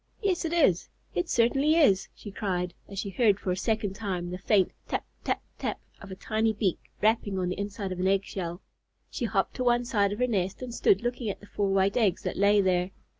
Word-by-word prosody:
"Yes, 380 -5 0
it 325 - -1
is! 290 - +3 0.2
It 175 - -1
certainly 270 +6 +3
is!" 200 - +4
she 205 - -9
cried, 180 -3 -2 0.2
as 200 - -9
she 200 0 -3
heard 205 -1 +3
for 185 - -2
a - - +1
second 205 +1 -1
time 185 -4 -3
the 180 - -5
faint 195 -1 +3 0.2
"tap - - -2 0.2
tap - - -1 0.2
tap" - - -2 0.2
of 200 - -10
a 190 - -6
tiny 220 +3 0
beak 200 -4 0 0.2
rapping 215 -2 +2
on 180 -1 0
the 180 - -4
inside 200 -1 -4
of 185 - -4
an 185 - +1
egg 195 0 +3
shell. 175 -3 -5 0.5
She 240 - -2
hopped 200 -4 0
to 255 - -1
one 240 0 +3
side 205 -4 +2
of 205 - -3
her 250 - +2
nest 195 -2 -1
and 245 -2 -6
stood 200 -2 +3
looking 240 -2 -2
at 195 - -4
the - - -14
four 205 -1 -1
white 195 +3 +2
eggs 205 -7 +2
that - - -2
lay 200 +1 +4
there. 180 -1 +1
200 Hz, 230 wpm, -28 LUFS, 190-230 Hz, 0.5 s, is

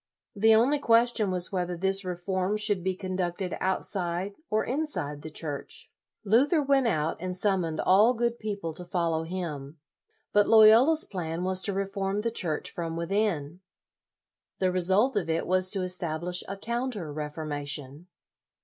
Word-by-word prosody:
The 220 +2 +5
only 265 +6 +3
question 230 -4 +3
was 180 -1 +2
whether 180 -2 -2
this 195 +2 +1
reform 185 +2 -2
should 210 -4 0
be 190 0 -1
conducted 185 -1 -3
outside 190 0 -1 0.2
or 215 0 +1
inside 245 - -3
the 155 - -7
Church. 150 -2 -7 0.3
Luther 260 - +3
went 275 -2 +2
out, 160 -6 0
and 180 +1 -4
summoned 180 -5 0
all 215 +7 +4
good 235 0 -1
people 200 -6 -4
to 180 - -6
follow 170 -2 -1
him. 160 -5 -6 0.6
But 205 0 +4
Loyola's 225 +8 +6
plan 170 -2 -4
was 185 0 +1
to 200 - +1
reform 195 +1 -2
the 230 +1 -2
Church 165 -9 -1
from 165 -3 -4
within. 170 -3 -1 1.0
The 185 -1 +1
result 190 +8 +2
of 180 -6 -1
it 165 +1 0
was 185 0 +2
to 195 -1 0
establish 180 -1 -2
a 195 - -5
counter 235 - -4
reformation. 150 0 -4
185 Hz, 150 wpm, -27 LUFS, 170-215 Hz, 1.0 s, Loyola's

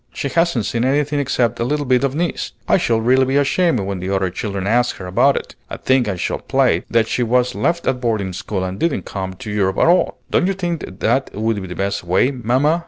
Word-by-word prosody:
"She 140 - -3
hasn't 165 - +1
seen 115 0 -1
anything 145 +2 +1
except 125 -5 0
a - - +1
little 145 +4 -1
bit 130 0 +2
of 140 0 0
Nice. 170 +2 -2
I - - +4
shall 115 -10 +1
really 130 +4 +3
be 135 +1 -1
ashamed 145 - +2
when 95 -1 -3
the 90 +1 -4
other 95 -2 0
children 100 0 -4
ask 120 +4 +2
her 90 - -8
about 90 - +3
it. - - -6 0.2
I - - -5
think 130 -3 +2
I 100 - -1
shall 90 - -2
play - - +1
that 115 -1 +2
she 125 - -1
was 125 +1 +2
left 165 - -1
at 125 -1 0
boarding 110 -6 -1
school 95 +1 -3
and 95 +1 -4
didn't 170 -3 0
come 95 -1 -5
to 105 - -7
Europe 95 -2 0
at - - +4
all! 175 +2 +3
Don't 180 - +2
you 195 - +1
think 175 -4 -3 0.2
that 130 +4 +1
would 110 0 -1
be 95 - -6
the 90 - -7
best 100 +1 -2
way, 95 +9 +2
mamma?" 130 +6 +1
120 Hz, 240 wpm, -19 LUFS, 100-140 Hz, 0.2 s, I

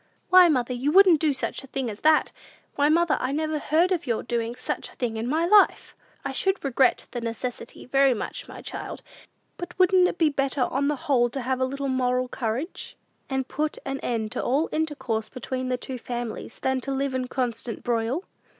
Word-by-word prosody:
"Why, 365 -1 +8
mother, 250 -4 +1
you 260 +4 0
wouldn't 370 -3 +7
do 310 -1 +2
such 270 +1 -3
a - - -11
thing 265 -1 -3
as 210 -2 -6
that! 310 0 +3 0.4
Why, 290 +1 +2
mother, 335 0 +3
I 255 - -1
never 310 +1 -1
heard 330 +6 +2
of 345 -5 -1
your 230 -2 0
doing 235 0 -2
such - - -4
a - - -18
thing 235 -3 -2
in 225 +2 -3
my 315 +5 +1
life!" 410 +3 +4 0.3
"I 275 - -1
should 385 +5 +1
regret 265 -1 +2
the 240 - -4
necessity 235 +1 -5
very 270 0 +3
much, - - -5
my - - -10
child; - - -6 0.5
but 355 0 -7
wouldn't 370 -1 +5
it 355 - -4
be 320 -2 +4
better, 275 -1 -1
on 275 +3 +1
the 295 - +1
whole, 245 -4 +3
to 270 +3 -4
have 260 +1 -1
a - - +4
little 275 +1 -3
moral 255 -1 +1
courage, 250 - -4 0.3
and 265 -1 -1
put 300 +1 -2
an 270 0 -3
end 220 -3 -2
to - - -2
all 280 +6 +1
intercourse 260 -9 -2
between 255 +1 -4
the 250 - 0
two 255 0 -6
families, 240 -1 -5
than 265 0 -1
to 275 - -4
live 270 0 -1
in 260 -1 -1
a - - -9
constant 245 -3 -3
broil?" 240 +7 -1
265 Hz, 210 wpm, -25 LUFS, 245-305 Hz, 0.5 s, Why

